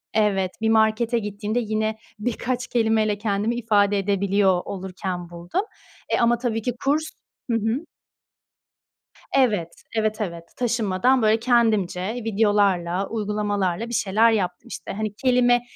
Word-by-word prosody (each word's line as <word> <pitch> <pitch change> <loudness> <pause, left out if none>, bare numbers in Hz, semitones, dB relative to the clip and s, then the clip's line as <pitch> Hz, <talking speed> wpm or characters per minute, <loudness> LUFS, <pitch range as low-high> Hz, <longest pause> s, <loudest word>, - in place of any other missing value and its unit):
evet, 195 -4 +2
bir 220 - +2
markete 220 +2 +3
gittiğimde 210 +2 -2
yine 220 -1 -1 0.2
birkaç 245 +3 -2
kelimeyle 220 -3 +1
kendimi 210 +2 -1
ifade 205 -3 +2
edebiliyor 195 -1 +2
olurken 185 -2 -5
buldum. 175 - -3 0.5
Eee, - - +2
ama 235 0 +3
tabii 230 -2 -2
ki 245 +2 -2
kurs 295 +3 +2 0.5
hı 230 - +3
hı. 225 +9 -1 1.5
Evet, 210 -11 +3 0.3
evet, 215 0 0
evet. 170 -4 -4
Taşınmadan 240 +1 +2
böyle, 220 +1 +3
kendimce, 220 -5 +1
videolarla, 200 -5 +1
uygulamalarla 210 -2 -1
bir - - -6
şeyler 220 +1 +3
yaptım 200 +2 -2
işte. - - -7
Hani, 215 0 -3
kelime, 245 -1 +3
215 Hz, 125 wpm, -23 LUFS, 200-235 Hz, 1.5 s, markete